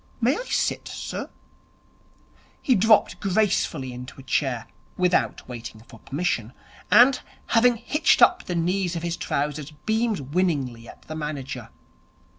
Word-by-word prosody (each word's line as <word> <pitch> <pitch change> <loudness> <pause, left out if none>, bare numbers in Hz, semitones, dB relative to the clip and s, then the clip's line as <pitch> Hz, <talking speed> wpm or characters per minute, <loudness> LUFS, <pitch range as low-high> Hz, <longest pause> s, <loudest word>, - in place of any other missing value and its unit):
'May 250 +4 +3
I - - -5
sit, - - -1
sir?' - - -5 1.3
He 260 - +2
dropped 220 0 +4
gracefully 185 -9 0
into 125 +2 -9
a - - -10
chair, 130 -2 -1 0.3
without 180 -1 +1
waiting 115 -3 -8
for 115 0 -15
permission, 135 -6 -2 0.4
and, 250 +2 +6 0.3
having 240 +1 +4
hitched 295 +7 +2
up 365 - +5
the 180 - -3
knees 175 +1 0
of 165 - -4
his 170 0 -1
trousers, 150 -1 -2 0.2
beamed 220 - -1
winningly 140 -10 0
at - - -13
the 155 - -8
manager. 140 -6 -5
165 Hz, 135 wpm, -24 LUFS, 130-215 Hz, 1.3 s, and